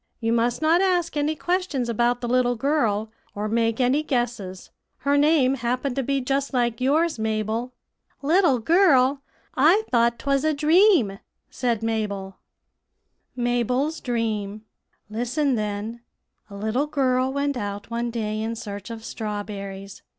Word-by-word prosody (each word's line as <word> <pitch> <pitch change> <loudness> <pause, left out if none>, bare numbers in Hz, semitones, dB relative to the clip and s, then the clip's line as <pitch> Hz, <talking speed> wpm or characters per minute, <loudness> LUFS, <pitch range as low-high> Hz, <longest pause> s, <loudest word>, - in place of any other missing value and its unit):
You 225 -1 0
must 235 +4 0
not 330 +3 +4
ask 355 -4 +1
any 295 +1 0
questions 350 -7 -1
about 240 +1 +1
the 240 - -3
little 245 0 +2
girl, 225 -5 0 0.2
or 205 +1 -2
make 230 +1 0
any 260 +4 +3
guesses. 240 -9 -3 0.3
Her 280 0 +2
name 285 -3 +4
happened 250 +1 -2
to 275 - 0
be 275 +1 -1
just 275 +1 -1
like 240 -1 0
yours, 305 +2 +2
Mabel." 220 +2 -2 0.5
"Little 320 -2 +4
girl! 275 - +4 0.3
I 335 +11 +5
thought 235 -1 +3
'twas 275 0 0
a 310 -1 +1
dream," 305 - +4 0.3
said 235 -3 -1
Mabel. 200 -4 -3 1.0
[Illustration: 245 - -2
MABEL'S 250 +6 0
DREAM.] 215 -4 -2 0.5
"Listen, 245 +6 -1
then: 215 +1 -3 0.5
A 200 - -10
little 220 +8 -1
girl 260 -3 +1
went 280 0 -1
out 205 -1 -5
one 235 +1 -1
day 215 -2 -3
in 225 +1 -3
search 205 -2 -7
of 225 -1 -8
strawberries. 200 -2 -6
245 Hz, 145 wpm, -24 LUFS, 220-280 Hz, 1.0 s, I